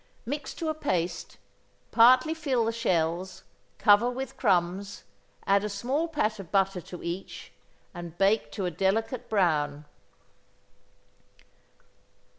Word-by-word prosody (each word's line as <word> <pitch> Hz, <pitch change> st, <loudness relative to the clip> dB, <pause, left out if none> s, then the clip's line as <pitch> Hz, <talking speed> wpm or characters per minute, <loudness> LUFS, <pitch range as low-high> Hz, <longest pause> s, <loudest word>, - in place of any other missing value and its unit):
Mix 280 Hz, +3 st, -5 dB
to 330 Hz, -, -4 dB
a 315 Hz, -, 0 dB
paste. 185 Hz, -, -3 dB, 0.5 s
Partly 255 Hz, +6 st, +6 dB
fill 275 Hz, -8 st, 0 dB
the 225 Hz, -, 0 dB
shells, 185 Hz, -4 st, -1 dB, 0.3 s
cover 210 Hz, +3 st, +5 dB
with 260 Hz, +1 st, -5 dB
crumbs, 185 Hz, +3 st, 0 dB, 0.4 s
add 200 Hz, 0 st, +3 dB
a 210 Hz, -, -2 dB
small 255 Hz, +11 st, -1 dB
pat 225 Hz, -10 st, -1 dB
of 180 Hz, -4 st, -9 dB
butter 195 Hz, -2 st, +1 dB
to 180 Hz, +2 st, -10 dB
each, 175 Hz, +3 st, -6 dB, 0.4 s
and 175 Hz, -2 st, -8 dB
bake 195 Hz, -6 st, +2 dB
to 190 Hz, -, -3 dB
a 180 Hz, -, -1 dB
delicate 225 Hz, -, -1 dB
brown. 150 Hz, -7 st, +1 dB
200 Hz, 120 wpm, -27 LUFS, 175-245 Hz, 0.5 s, Partly